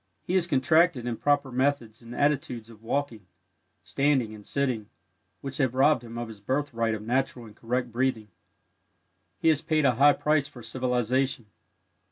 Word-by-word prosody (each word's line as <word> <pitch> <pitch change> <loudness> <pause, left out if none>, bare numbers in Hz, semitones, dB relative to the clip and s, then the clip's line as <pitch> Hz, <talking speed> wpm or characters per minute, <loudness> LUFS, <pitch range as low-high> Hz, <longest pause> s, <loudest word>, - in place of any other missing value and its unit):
He 180 - -4
has 185 -2 +2
contracted 155 -1 +3
improper 140 +3 0
methods 125 -4 -1
and 115 +1 -10
attitudes 125 -6 -1
of 110 -1 -16
walking, 115 -4 -3 0.6
standing 135 -6 +1
and 105 -1 -11
sitting, 125 -4 -2 0.5
which 135 0 -5
have 130 -3 0
robbed 135 -1 +4
him 115 0 -9
of 120 0 -4
his 110 -2 -11
birthright 115 -2 -1
of 105 - -7
natural 125 +1 -1
and 105 -2 -14
correct 120 +1 -2
breathing. 120 -3 -1 1.1
He 165 - +2
has 155 -2 +2
paid 155 -2 +1
a 130 - +4
high 140 +4 +6
price 150 -1 +1
for 125 -5 -13
civilization. 125 +1 -1
130 Hz, 160 wpm, -27 LUFS, 115-145 Hz, 1.1 s, high